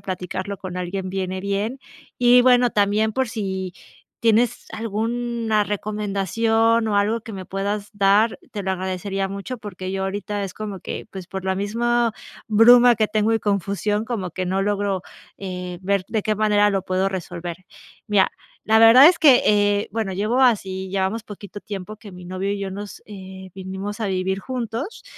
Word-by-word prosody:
platicarlo 185 +1 -5
con 180 -1 -6
alguien 185 +1 -4
viene 185 0 -3
bien. 200 +6 -2 0.4
Y 245 0 +6
bueno, 245 -1 +5
también 210 +2 +2
por 260 0 0
si, 190 -5 -4 0.5
tienes 230 +1 +2
alguna 225 0 -1
recomendación 215 +2 0
o 205 - +1
algo 215 +3 +1
que 220 -1 -9
me 190 -1 -6
puedas 200 +2 -3
dar, 205 +2 +3
te 205 - -5
lo 190 - -2
agradecería 190 +1 -2
mucho, 200 +6 -6
porque 190 -3 -6
yo 190 0 -2
ahorita 205 +1 -3
es 190 -2 -5
como 205 -3 -6
que, - - -6
pues, 190 -2 -8
por 190 -1 -6
la 190 - 0
misma 230 +4 0 0.4
bruma 240 +2 +7
que 215 0 +2
tengo 215 +1 +1
y - - +2
confusión, 205 +1 -1
como 205 -7 -3
que 185 +2 -4
no 190 +2 0
logro, 200 -2 -1 0.3
eh, 180 -2 -6
ver 195 0 0
de 220 -2 -1
qué 215 - 0
manera 210 -1 +3
lo 195 -1 0
puedo 185 +1 0
resolver. 175 -2 -5 0.5
Mira, 205 -2 +3 0.3
la 220 +1 +4
verdad 230 +5 +9
es 340 0 +5
que, 275 -5 +7
eh, 205 0 +3
bueno, 220 -3 -2
llevo 215 +7 0
así 190 -6 +1
llevamos 195 +3 -1
poquito 205 -1 -10
tiempo 205 0 -7
que 210 -1 -12
mi 180 0 -11
novio 185 +2 -3
y 205 - -2
yo 195 -1 -4
nos, 205 +1 -8
eh, 190 -2 -10
vinimos 190 +3 -6
a 215 - -1
vivir 190 0 -1
juntos 250 - -5
205 Hz, 175 wpm, -22 LUFS, 190-220 Hz, 0.5 s, verdad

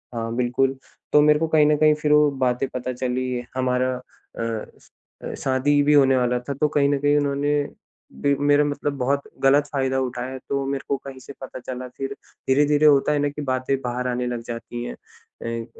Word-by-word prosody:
हाँ, 115 0 -3
बिल्कुल 125 +2 +1 0.4
तो 150 - +7
मेरे 150 0 +5
को 165 - 0
कहीं 155 -1 +4
न 150 0 +4
कहीं 155 0 +5
फिर 150 -1 +1
वो 150 0 +6 0.2
बातें 125 +2 0
पता 130 0 -3
चली 125 0 -2
हमारा 130 0 +1
अ 125 -2 -12 0.8
अ, - - -5
शादी 140 +2 +2
भी 150 +1 +3
होने 135 -2 +5
वाला 125 0 +1
था, 125 +3 -5
तो 145 +3 +1
कहीं 145 -2 +2
न 145 - +2
कहीं 145 +1 +3
उन्होंने 145 0 0 0.7
भी 140 0 +3
मेरा 145 0 +5
मतलब 145 0 -2
बहुत 135 +2 0 0.2
गलत 140 +2 +5
फायदा 130 -1 0
उठाया 130 0 -3
तो 140 -1 -1
मेरे 135 0 -3
को 140 - 0
कहीं 135 -1 -8
से 130 +2 -11
पता 130 -1 -7
चला। 130 0 -6
फिर 135 0 -3 0.4
धीरे-धीरे 145 +2 +4
होता 145 -1 +5
है 150 - +1
न 145 0 +1
कि 150 - -7
बातें 130 -1 0
बाहर 125 0 -3
आने 125 0 -1
लग 120 -1 -3
जाती 120 0 -6
हैं। - - -6
अ 115 0 -8
135 Hz, 200 wpm, -23 LUFS, 125-145 Hz, 0.8 s, तो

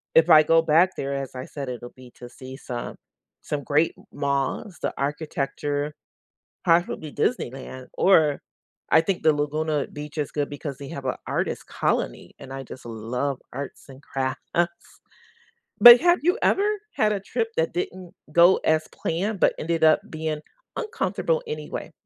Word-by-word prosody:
if 160 +1 +6
I 155 -2 +9
go 165 +1 +4
back 165 +4 +4
there, 140 0 -3
as 135 -1 -5
I 130 - -5
said, 140 -2 -7
it'll 120 -1 -6
be 125 -1 -14
to 120 - -11
see 130 +1 -10
some 125 -3 -6 0.5
some 145 -1 -4
great 150 +4 +2
m - - -17
malls, 140 - -2
the - - -1
architecture, 145 0 -2 0.7
possibly 165 -3 +1
Disneyland 130 - -3
or 160 -7 +4 0.5
I 160 - +8
think 185 +1 -2
the 155 - +5
Laguna 150 0 -1
Beach 150 +1 -8
is 150 - -2
good 145 -1 -2
because 145 -1 -6
they 140 - -8
have 140 - -7
a 130 - -1
artist - - -2
colony, - - -2
and 135 -1 -9
I 135 0 -6
just 130 0 -11
love 125 +5 -3
arts 140 +2 -7
and 135 +1 -13
crafts. 130 -3 -4 1.3
But 240 0 +12
have 350 +1 +4
you 355 +3 +3
ever 400 +2 +3 0.3
had 210 -1 +2
a 200 - -2
trip 225 +3 -2
that 160 0 +1
didn't 180 0 -5 0.2
go 170 +4 +7
as 155 0 +2
planned 195 +5 -2
but - - +5
ended 165 +1 -1
up 155 -1 +6
being 155 -1 -3 0.4
uncomfortable 480 +2 -1
anyway? 455 - -5
150 Hz, 165 wpm, -24 LUFS, 135-170 Hz, 1.3 s, But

